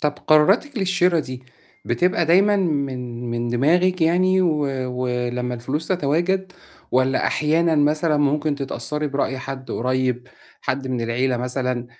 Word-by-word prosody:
طَب 150 -1 0
قراراتِك 195 - +2
للشرا 180 -2 +2
دي، 130 -3 -8 0.4
بتبقى 170 +7 +1
دائمًا 195 +5 +4
من 130 -9 -2
من 120 0 -2
دماغِك 175 +9 +2
يعني 185 +3 +3
و 160 -4 +1 0.4
و 125 - -1 0.2
لمّا 125 0 -3
الفلوس 130 +7 -4
تتواجد، 185 +3 0 0.4
والَّا 130 +1 +2
أحيانا 160 +2 +1
مثلًا 150 +2 +2
ممكن 145 +1 +1
تتأثّري 150 +2 -3
برأي 140 -2 -2
حد 130 0 -7
قريّب، 125 0 -1 0.3
حد 130 0 -3
من 125 -2 -2
العيلة 125 +2 0
مثلًا، 125 0 -2
145 Hz, 135 wpm, -21 LUFS, 125-170 Hz, 0.4 s, دائمًا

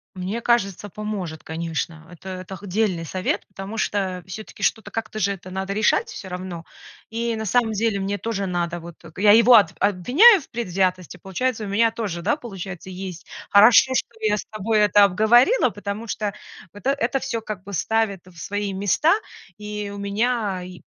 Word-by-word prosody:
Мне 190 +5 -4
кажется, 205 -4 0
поможет, 195 -6 -5
конечно. 160 0 -4
Это 175 +2 -10
это 185 0 -7
х 195 - -11
дельный 185 -3 0
совет, 185 +4 -2
потому 195 +3 -8
что 190 -4 -1
всё-таки 200 +4 -9
что-то 220 - 0
как-то 220 -1 -5
же 200 -1 +1
это 185 -1 -11
надо 190 +1 -3
решать 310 - +2
всё 430 - -8
равно. 180 -2 -6 0.4
И 230 0 -2
на 220 - -4
самом 225 +1 +2
деле 215 -1 0
мне 200 +1 -2
тоже 200 -3 -3
надо, 175 -1 -2
вот. 170 0 -10 0.2
Я 205 +2 +6
его 230 +3 +7
об 205 -6 +7
обвиняю 260 - +6
в - - -17
предвзятости, 185 -5 -1
получается, 220 +6 -2
и - - -6
у - - -6
меня 225 +3 +3
тоже, 210 -7 -4
да, 215 - +1
получается, 195 - -8
есть 185 -1 -7 0.2
Хорошо, 225 +5 +7
что - - 0
я 210 -1 +2
с - - -6
тобой 215 +1 0
это 205 -1 +5
обговорила, 240 - +4
потому 205 +2 -6
что 210 -1 -2 0.4
вот 205 - -11
это - - +5
это 270 -1 0
всё 230 -3 -3
как 215 -4 -6
бы 200 0 -9
ставит 220 0 0
в 180 -2 -17
свои 205 +4 -3
места, 205 - +2 0.4
и 210 -1 -5
у - - -7
меня 200 -1 -1
и 180 -1 -10
200 Hz, 185 wpm, -23 LUFS, 185-225 Hz, 0.4 s, его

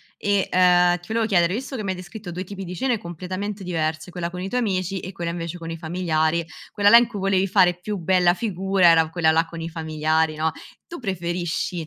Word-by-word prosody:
e, 200 -1 0
ehm, 180 -1 +4
ti 175 - -17
volevo 225 0 0
chiedere, 180 -4 +2
visto 265 +4 -4
che 215 - -4
m'hai 190 -1 -1
descritto 180 +1 -9
due 180 +2 -5
tipi 195 0 -7
di 180 0 -7
cene 255 -3 +1
completamente 185 +2 -6
diverse, 155 -1 -2
quella 175 -1 -4
con 180 0 -7
i 185 - -4
tuoi 250 +4 -1
amici 190 -3 -1
e 185 - -7
quella 170 -2 -4
invece 170 0 -5
con 165 -1 -8
i 165 - -5
familiari, 165 -1 0 0.3
quella 205 0 +1
là 230 - +8
in 240 0 +7
cui 210 -4 -7
volevi 195 0 +2
fare 185 -2 +4
più 205 +3 -4
bella 180 0 +3
figura 190 -2 +1
era 165 -1 +5
quella 165 -2 +2
là 165 +1 +3
con 165 0 -9
i 165 - -4
familiari, 160 -1 0
no? 160 0 0 0.3
Tu 340 - -8
preferisci 175 -4 -3
180 Hz, 225 wpm, -23 LUFS, 165-195 Hz, 0.3 s, là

